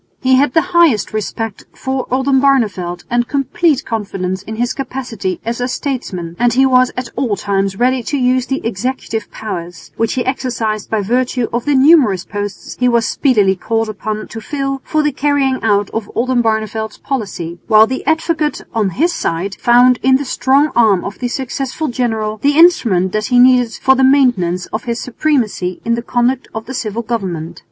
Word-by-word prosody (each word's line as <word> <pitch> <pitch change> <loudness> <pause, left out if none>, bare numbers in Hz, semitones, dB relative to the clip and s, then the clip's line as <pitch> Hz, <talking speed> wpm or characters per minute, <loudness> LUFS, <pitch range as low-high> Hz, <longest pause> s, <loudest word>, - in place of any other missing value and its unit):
He 260 0 +2
had 265 0 +3
the 325 - +6
highest 325 - +3
respect 215 0 -4
for 265 -1 -3
Oldenbarneveldt 255 -9 +1
and 240 0 +1
complete 280 +2 0
confidence 195 -4 -3
in 220 +2 -7
his 240 +2 -1
capacity 245 -9 -4
as 235 +1 -3
a 245 - 0
statesman, 215 - -4
and 240 0 +3
he 265 +2 +4
was 255 -1 +4
at 250 -1 -4
all 245 -6 0
times 195 -1 -1
ready 255 +2 +2
to 285 +5 -2
use 255 -1 +1
the 270 -3 -3
executive 225 0 -3
powers, 175 -5 -7
which 225 -1 0
he 250 - -2
exercised 235 -5 -2
by 220 -2 0
virtue 245 +3 0
of 240 0 -2
the 290 -1 +2
numerous 260 - +4
posts 205 -1 -6
he 250 0 +3
was 235 -1 +2
speedily 210 -9 +2
called 225 +3 -2
upon 215 +1 -4
to 225 - -7
fill, 275 +2 -3
for 310 -1 0
the 300 - +1
carrying 275 -1 +1
out 205 -2 +1
of 225 -2 -4
Oldenbarneveldt's 220 -3 -1
policy; 195 -10 -4
while 215 0 +6
the 260 +3 -4
Advocate 315 -1 0
on 215 -4 +1
his 340 +5 +2
side 175 +4 -2
found 245 +1 +5
in 260 0 +4
the 280 +2 -1
strong 275 +3 +2
arm 215 -6 +3
of 200 - -6
the 245 - -1
successful 270 +3 -3
general 220 -3 -2
the 285 +7 +1
instrument 225 - +4
that 215 +1 -1
he 250 - +2
needed 250 -2 +5
for 265 - +3
the 265 - +2
maintenance 245 -11 +3
of 220 - -3
his 235 -1 -2
supremacy 235 -9 -1
in 235 - +1
the 235 - -1
conduct 245 +2 0
of 220 0 -5
the 265 - -7
civil 230 -2 -3
government. 185 -9 -4
240 Hz, 180 wpm, -16 LUFS, 215-265 Hz, -, the